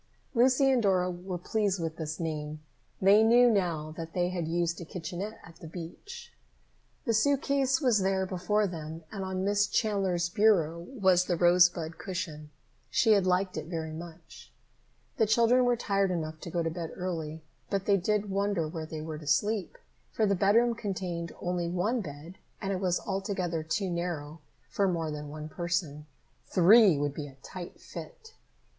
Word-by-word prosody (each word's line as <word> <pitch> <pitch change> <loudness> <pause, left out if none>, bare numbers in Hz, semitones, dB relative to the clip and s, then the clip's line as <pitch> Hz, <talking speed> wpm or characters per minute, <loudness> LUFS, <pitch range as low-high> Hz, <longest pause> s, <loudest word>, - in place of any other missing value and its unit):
Lucy 260 +2 +4
and 255 -2 +3
Dora 185 -3 +2
were 180 +1 -5
pleased 200 +1 0
with 165 -1 -3
this 155 -1 -4
name. 155 -2 -4 0.4
They 200 +3 +6
knew 240 +2 +6
now 170 -7 0
that 165 -1 -6
they 175 -1 +1
had 175 -3 -3
used 170 +1 -1
a - - -4
kitchenette 180 +6 -6
at 165 0 -14
the 165 - -10
beach. 175 - -9 0.7
The 230 - +1
suit 275 +5 +2
case 270 -1 +2
was 245 -6 +3
there 190 0 +1
before 190 +3 0
them 160 -3 -6
and 195 -2 -4
on 190 0 -2
Miss 205 +1 +2
Chandler's 195 -5 +1
bureau 175 -5 +3
was 190 -8 +3
the 180 - 0
rosebud 175 -1 +3
cushion. 160 -5 -5 0.4
She 225 - +3
had 200 -3 +4
liked 185 +1 +1
it - - -5
very 160 -2 -4
much. 165 0 -11 0.7
The 220 - +3
children 235 +3 +4
were 245 0 +3
tired 200 -3 +1
enough 160 -3 -3
to 170 - -7
go 170 0 -1
to 165 - -1
bed 165 -1 -5
early, 160 -4 -4 0.3
but 195 -1 -1
they 200 -1 +4
did 205 +2 0
wonder 200 -4 0
where 160 0 -6
they 155 -1 -6
were 155 -1 -6
to 150 - -11
sleep, 205 +6 0 0.3
for 220 - +1
the 200 - +2
bedroom 210 +6 +3
contained 185 -6 -4
only 175 -1 -1
one 210 +8 0
bed, 155 +1 -9 0.2
and 195 -1 -2
it 185 - -3
was 180 -2 +1
altogether 190 -4 -2
too 180 +4 -2
narrow 165 -3 -4 0.3
for 200 - +1
more 165 -4 -1
than 150 -1 -6
one 155 +1 -7
person. 170 -3 -3 0.4
Three 190 -1 +6
would 145 0 -1
be 145 0 -5
a 135 - -13
tight 180 +2 -8
fit. 450 0 -10
180 Hz, 175 wpm, -29 LUFS, 165-205 Hz, 0.7 s, They